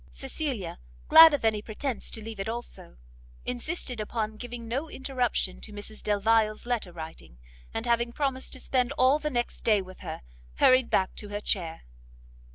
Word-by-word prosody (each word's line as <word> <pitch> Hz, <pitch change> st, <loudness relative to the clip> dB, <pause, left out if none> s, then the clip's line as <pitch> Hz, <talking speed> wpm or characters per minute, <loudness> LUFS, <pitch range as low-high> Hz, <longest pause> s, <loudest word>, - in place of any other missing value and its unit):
Cecilia, 265 Hz, -, -4 dB, 0.3 s
glad 325 Hz, 0 st, +11 dB
of 290 Hz, -5 st, -1 dB
any 215 Hz, -2 st, +2 dB
pretence 230 Hz, +3 st, -4 dB
to 220 Hz, -, -4 dB
leave 220 Hz, -2 st, -7 dB
it 195 Hz, -, -2 dB
also, 235 Hz, -, -7 dB, 0.5 s
insisted 250 Hz, 0 st, -3 dB
upon 215 Hz, 0 st, -2 dB
giving 240 Hz, 0 st, -7 dB
no 275 Hz, +7 st, -2 dB
interruption 250 Hz, -9 st, -1 dB
to 215 Hz, -, -8 dB
Mrs 205 Hz, +1 st, -9 dB
Delvile's 215 Hz, +1 st, +2 dB
letter 235 Hz, -7 st, -1 dB
writing, 160 Hz, -, -9 dB, 0.3 s
and 225 Hz, -, -3 dB
having 235 Hz, 0 st, +2 dB
promised 265 Hz, 0 st, -2 dB
to 260 Hz, -, -7 dB
spend 250 Hz, -1 st, +1 dB
all 260 Hz, +4 st, +4 dB
the 300 Hz, -, -2 dB
next 240 Hz, -4 st, -2 dB
day 215 Hz, -3 st, +4 dB
with 185 Hz, -1 st, -9 dB
her, -, -, -7 dB, 0.3 s
hurried 255 Hz, -, +5 dB
back 190 Hz, -1 st, +2 dB
to 210 Hz, -, -6 dB
her 205 Hz, 0 st, -3 dB
chair. 170 Hz, -6 st, -2 dB
230 Hz, 165 wpm, -28 LUFS, 210-255 Hz, 0.5 s, glad